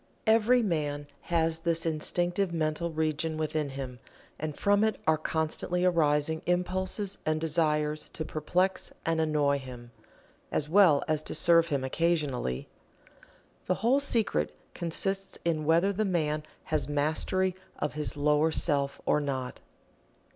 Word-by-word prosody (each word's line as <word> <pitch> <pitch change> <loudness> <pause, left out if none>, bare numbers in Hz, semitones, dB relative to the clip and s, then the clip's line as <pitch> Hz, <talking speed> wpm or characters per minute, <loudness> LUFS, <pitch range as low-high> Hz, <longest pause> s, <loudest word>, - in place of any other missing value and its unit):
Every 230 +2 +4
man 145 -6 -1 0.2
has 165 -1 +1
this 165 0 -1
Instinctive 175 +4 0
mental 160 +1 -1
region 155 0 -1
within 155 -1 -1
him 135 -2 -6 0.4
and 155 -1 -4
from 205 +1 +3
it 220 0 +1
are 160 - +4
constantly 160 +3 -1
arising 160 -2 +2
impulses 185 +3 -1
and 155 0 0
desires 155 -1 0
to 155 - -4
perplex 180 +6 -1
and 165 -1 +1
annoy 145 -2 +2
him, 125 -2 -10 0.6
as 150 - 0
well 170 -4 +5
as 155 -1 +1
to - - -6
serve 165 -1 +4
him 140 -4 -1
occasionally. 140 - -1 1.0
The 185 - +2
whole 260 +4 +5
secret 205 - +1 0.2
consists 195 +3 -2
in 155 -3 0
whether 170 +6 +3
the 215 +3 0
man 155 -6 0 0.2
has 150 -3 -1
Mastery 160 +6 +1 0.2
of 150 - -2
his 150 0 -1
lower 150 +2 +3
self 140 -4 +1
or - - +3
not. 130 -3 -3
160 Hz, 135 wpm, -29 LUFS, 150-175 Hz, 1.0 s, well